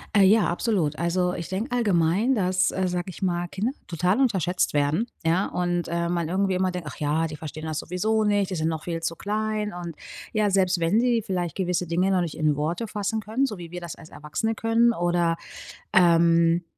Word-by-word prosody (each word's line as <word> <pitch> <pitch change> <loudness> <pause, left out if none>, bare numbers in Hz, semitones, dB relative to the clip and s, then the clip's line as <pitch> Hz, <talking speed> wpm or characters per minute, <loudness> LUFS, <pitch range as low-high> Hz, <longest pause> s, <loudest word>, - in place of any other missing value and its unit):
Äh, 200 - +6
ja, 210 +1 +5
absolut. 170 -4 0
Also, 180 +1 +1
ich 170 - -5
denke 225 +7 -2
allgemein, 205 +2 +2
dass, 185 -2 +2
äh, 185 0 -1
sage 180 +1 -3
ich 185 - -8
mal, 175 -1 0
Kinder 205 +8 -2 0.2
total 180 +6 +1
unterschätzt 185 - +1
werden, 145 +10 +1 0.2
ja, 170 +4 +2
und, 175 -1 -1
äh, 170 0 -1
man 170 -2 -1
irgendwie 190 +1 +1
immer 185 0 +1
denkt: 180 -4 -6
„Ach - - -12
ja, 150 +2 +1
die 155 -1 -5
verstehen 155 +1 -7
das 155 -1 -2
sowieso 215 +7 0
nicht. 205 -2 +1
Die - - -1
sind 160 -1 0
noch 160 -1 -3
viel 165 -1 -3
zu 165 0 -2
klein." 210 0 -2
Und 170 -3 -6 0.4
ja, 210 -2 +1
selbst 185 -2 +2
wenn 170 +6 +2
sie 235 -2 +2
vielleicht 175 -4 -2
gewisse 180 -2 -1
Dinge 180 +3 +1
noch 185 -2 +2
nicht 165 -2 -4
in 155 -2 +2
Worte 165 +10 -2
fassen 210 +2 -2
können, 225 +6 0
so 210 - -6
wie 170 -2 -9
wir 175 0 -6
das 170 - -6
als 160 - -14
Erwachsene 155 +9 -3
können, 230 +1 +3
oder, 175 -2 +1 0.6
ähm, 170 -1 +4
180 Hz, 210 wpm, -25 LUFS, 170-205 Hz, 0.6 s, Äh